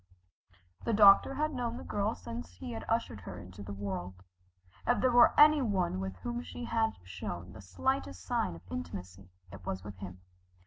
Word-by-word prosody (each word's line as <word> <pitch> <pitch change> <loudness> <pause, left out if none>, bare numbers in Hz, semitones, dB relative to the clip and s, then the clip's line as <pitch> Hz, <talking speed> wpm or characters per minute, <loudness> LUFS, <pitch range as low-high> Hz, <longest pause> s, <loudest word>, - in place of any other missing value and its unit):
The 230 - 0
doctor 205 +5 +7
had 305 +2 0
known 240 -2 -2
the - - -7
girl 205 +2 -1
since 235 +1 -7
he 255 -3 -6
ushered 225 - -2
her 90 0 -8
into 90 +3 -10
the 100 0 -7
world. 95 -2 -5 0.6
If - - +3
there 255 - +3
were 240 0 +6
any 300 0 +8
one 190 - 0
with 95 0 -4
whom 240 - -4
she 245 - -8
had 225 -1 +1
shown 90 -1 -6
the 105 - -10
slightest 90 0 -2
sign 90 - 0
of 85 - -12
intimacy, 90 +2 -6 0.2
it 95 -2 -10
was 95 +1 -4
with 105 -2 -8
him. 90 -1 -8
100 Hz, 180 wpm, -32 LUFS, -, 0.6 s, any